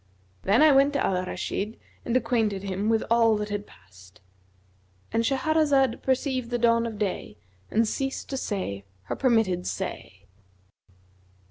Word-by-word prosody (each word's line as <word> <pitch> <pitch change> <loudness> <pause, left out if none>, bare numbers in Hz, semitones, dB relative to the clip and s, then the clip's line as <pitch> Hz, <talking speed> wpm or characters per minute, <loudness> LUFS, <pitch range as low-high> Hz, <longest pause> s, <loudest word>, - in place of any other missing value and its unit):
Then 210 +9 +4
I 310 - +7
went 275 +1 +4
to 280 - +1
Al 185 -1 0
Rashid 210 +4 -4 0.3
and 240 +1 +2
acquainted 225 -5 0
him 200 +2 -2
with 225 -1 +2
all 230 -2 +4
that 210 0 -4
had 205 0 -4
passed" 95 0 -19 0.9
And 225 0 +2
Shahrazad 275 -1 +2
perceived 260 -2 -1
the 245 - 0
dawn 230 0 +3
of 220 -2 -6
day 190 - -3 0.3
and 225 +1 +2
ceased 270 +3 -3
to 270 - -2
say 185 - -3 0.2
her - - -4
permitted 225 -9 +1
say. - - -6
230 Hz, 145 wpm, -26 LUFS, 200-260 Hz, 0.9 s, I